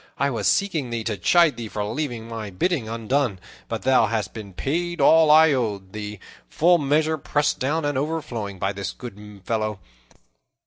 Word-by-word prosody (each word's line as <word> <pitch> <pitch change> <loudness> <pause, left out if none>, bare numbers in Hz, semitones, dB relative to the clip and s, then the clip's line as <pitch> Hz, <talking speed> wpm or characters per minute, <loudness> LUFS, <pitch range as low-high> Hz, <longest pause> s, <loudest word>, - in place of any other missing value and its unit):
I 140 0 +1
was 115 - -1
seeking 165 -10 +1
thee, 115 -1 -3
to 110 -1 -2
chide 155 - +3
thee 115 -2 -5
for 105 -1 -4
leaving 115 0 -4
my 110 -3 -6
bidding 115 - -1
undone; 115 -1 -1 0.3
but 115 -1 -4
thou 130 0 +4
hast 110 -1 -2
been 105 -3 -8
paid 170 - -2
all 160 -1 +6
I 155 0 +7
owed 105 -7 -2
thee, 105 -1 -6 0.3
full 175 +2 +4
measure, 155 +2 +1
pressed 145 +1 0
down 150 +4 0
and 145 -2 0
overflowing, 125 -10 -4
by 95 +2 -1
this 95 -1 -5
good 105 -4 -11
fellow. 110 -3 -2
120 Hz, 175 wpm, -23 LUFS, 105-150 Hz, 0.3 s, I